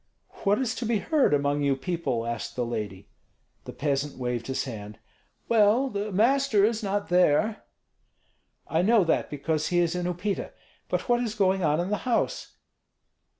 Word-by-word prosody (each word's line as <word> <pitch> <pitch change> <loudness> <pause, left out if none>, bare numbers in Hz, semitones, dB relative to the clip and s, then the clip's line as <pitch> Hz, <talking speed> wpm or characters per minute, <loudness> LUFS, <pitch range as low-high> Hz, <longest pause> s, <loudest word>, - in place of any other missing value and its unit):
"What 200 +1 +4
is 255 -4 -1
to 240 - -3
be 230 -1 +2
heard 295 - +2
among 145 0 +1
you 140 -1 +2
people?" 135 -6 -2
asked 120 -1 -4
the 125 - -1
lady. 105 -4 -5 0.6
The - - -7
peasant 140 +1 -2
waved 125 -2 -3
his 130 - -1
hand. 105 -4 -8 0.5
"Well, 230 +4 +3
the 205 +1 -3
master 230 +1 +3
is 225 +1 0
not 205 0 -2
there." 180 +4 +3 1.1
"I 160 - +1
know 215 +2 +4
that, 165 - 0
because 155 +2 -2
he 175 - 0
is 170 -1 +2
in 180 0 -2
Upita. 180 +3 -3 0.4
But - - -2
what 240 -1 +2
is 230 -3 -3
going 190 -2 +2
on 150 0 +2
in 180 +3 -2
the 210 - +1
house?" 235 - -1
180 Hz, 170 wpm, -26 LUFS, 140-215 Hz, 1.1 s, What